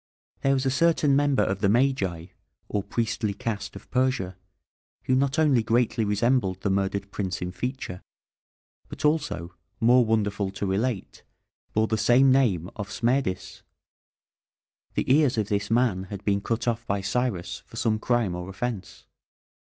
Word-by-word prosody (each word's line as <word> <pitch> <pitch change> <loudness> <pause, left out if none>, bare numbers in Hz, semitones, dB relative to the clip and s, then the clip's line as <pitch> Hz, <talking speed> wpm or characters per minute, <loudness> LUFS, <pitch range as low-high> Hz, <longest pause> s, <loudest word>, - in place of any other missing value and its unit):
There 135 0 +3
was 130 0 -1
a 130 - +2
certain 150 -1 +3
member 145 -1 +3
of 95 0 -1
the 100 -1 +2
Magi, 105 -9 +1 0.4
or 105 - -1
priestly 110 -1 -2
caste 105 -1 -4
of - - -11
Persia, 125 -8 0 0.7
who 130 - 0
not 135 +2 +1
only 145 -6 +4
greatly 115 +1 +1
resembled 105 -1 +1
the 100 - 0
murdered 100 +1 -1
prince 95 -3 -3
in 90 0 -4
feature, 125 -3 -5 0.9
but 150 - -5
also, 145 - 0 0.3
more 125 +2 +5
wonderful 105 -3 0
to 100 - -3
relate, 100 +2 -2 0.5
bore 110 +1 +3
the 110 -1 -1
same 130 +4 +5
name 110 -11 +2
of 105 -1 -5
Smerdis. 115 -6 -1 1.3
The - - 0
ears 145 -5 +3
of 105 -2 0
this 100 0 -1
man 115 -5 +2
had 100 +1 -8
been 100 -1 +1
cut 115 +3 -2
off 115 0 0
by 100 0 0
Cyrus 100 -2 -2
for - - -13
some 110 -1 0
crime 120 -5 +1
or 90 +1 -5
offence. 100 -1 -5
110 Hz, 155 wpm, -26 LUFS, 100-130 Hz, 1.3 s, more